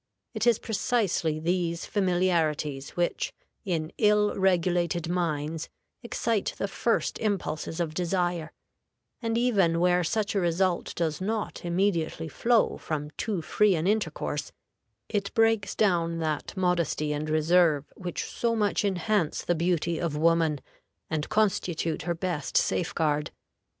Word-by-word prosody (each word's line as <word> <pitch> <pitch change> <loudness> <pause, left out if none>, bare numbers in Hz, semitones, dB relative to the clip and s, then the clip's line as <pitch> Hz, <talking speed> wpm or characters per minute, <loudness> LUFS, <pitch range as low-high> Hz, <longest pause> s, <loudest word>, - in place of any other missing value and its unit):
It - - -1
is 235 -3 +5
precisely 205 -8 0
these 170 0 -1
familiarities 165 -7 0
which, 175 0 0 0.3
in 165 -4 -2
ill 210 -1 +4
regulated 175 -3 +1
minds, 165 -2 -2 0.3
excite 230 -3 -1
the 200 - -1
first 230 +3 0
impulses 180 -6 -2
of 165 -3 -1
desire; 175 -2 -1 0.7
and 230 -1 0
even 195 -9 +3
where 180 0 +3
such 215 +3 0
a 200 - +1
result 175 0 0
does 160 -2 -1
not 215 +2 -3
immediately 170 -2 0
flow 230 +8 +2
from 150 -1 -4
too 190 -1 -3
free 210 +1 +3
an 160 0 -1
intercourse, 210 +2 -1 0.6
it 200 -2 -2
breaks 225 -2 +2
down 170 -5 +2
that 155 +3 -3
modesty 170 -5 +1
and 150 +1 -3
reserve 155 -1 +3
which 180 -3 -4
so 235 -1 -1
much 210 -2 +1
enhance 195 -2 0
the 175 - +2
beauty 170 -1 0
of 160 -4 -2
woman, 160 -2 +2 0.5
and 155 -1 -2
constitute 185 -6 0
her 170 +2 -2
best 170 -4 -2
safeguard. 150 -3 +1
175 Hz, 130 wpm, -27 LUFS, 160-200 Hz, 0.7 s, is